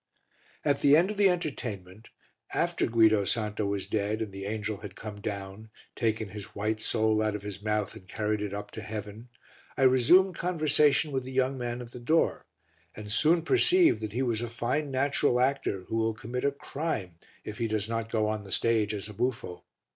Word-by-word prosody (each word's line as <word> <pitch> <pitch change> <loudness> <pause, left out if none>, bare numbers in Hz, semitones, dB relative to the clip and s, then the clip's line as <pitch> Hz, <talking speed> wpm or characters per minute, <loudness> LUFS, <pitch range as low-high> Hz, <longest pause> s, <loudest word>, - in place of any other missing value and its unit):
At 145 -2 +2
the 145 +1 +6
end 180 +5 +3
of 210 - -6
the 200 -1 +5
entertainment, 110 - -4 0.5
after - - +1
Guido 110 -2 +4
Santo 105 0 -1
was 100 -2 -2
dead 105 +1 -1
and 105 - -7
the 95 0 -6
angel 105 0 -3
had 100 -2 -9
come 105 -1 -8
down, 100 +1 -6 0.3
taken 110 -2 -1
his 105 +2 -9
white 110 +2 -1
soul 110 0 +1
out 110 -1 0
of 105 - -6
his 100 -1 -7
mouth 105 -1 -1
and 95 - -13
carried 105 +1 -1
it 105 -1 -3
up 105 +1 -6
to 110 - -7
heaven, 105 +2 -7 0.5
I 135 - +2
resumed 130 +9 +5
conversation 155 -3 +2
with 130 -2 -1
the 130 - -8
young 130 +1 +1
man 120 -1 -4
at 120 - -12
the 125 - -9
door, 155 +7 +1 0.5
and 105 -1 -7
soon 160 +9 +3
perceived 360 - +4
that 110 -1 -4
he 130 +3 0
was 115 -3 0
a 120 - -3
fine 125 +6 -1
natural 135 -1 +1
actor 125 -7 0
who 110 +5 -4
will 110 -1 +1
commit 120 +4 -4
a 140 - +3
crime 135 - -4 0.3
if 105 - -7
he 115 - 0
does 110 -1 -1
not 115 0 -3
go 110 -2 +1
on 110 0 -2
the 100 -1 -12
stage 110 -1 +1
as 100 0 -5
a 105 - -9
buffo. 115 -5 -3
110 Hz, 200 wpm, -29 LUFS, 105-130 Hz, 0.5 s, the